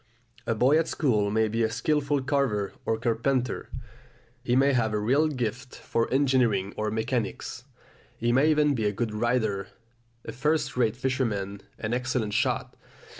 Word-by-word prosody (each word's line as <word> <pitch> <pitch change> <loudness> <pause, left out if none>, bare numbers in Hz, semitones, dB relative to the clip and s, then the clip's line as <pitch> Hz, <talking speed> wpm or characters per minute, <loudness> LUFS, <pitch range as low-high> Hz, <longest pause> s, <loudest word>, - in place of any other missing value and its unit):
A 115 - +1
boy 130 +8 +4
at 165 - 0
school 110 -9 +1
may 110 +1 +2
be 115 +2 -1
a 110 - +2
skilful 145 +3 0
carver 130 -8 0
or 110 - +1
carpenter; 120 +3 -1 0.7
he 125 -1 +1
may 135 +2 +4
have 110 -4 +1
a - - +1
real 135 +9 +3
gift 125 -3 -4
for 115 - -2
engineering 125 -8 +2
or 110 0 -1
mechanics; 110 +2 -3 0.5
he 120 +1 0
may 135 +6 +4
even 150 -1 +3
be 115 -5 -1
a - - +1
good 110 +1 -3
rider, 110 -4 0 0.6
a - - -5
first 150 +1 0
rate 120 -3 +1
fisherman, 115 -7 -2 0.2
an 110 +1 -3
excellent 125 -4 -1
shot. - - 0
120 Hz, 160 wpm, -27 LUFS, 110-135 Hz, 0.7 s, boy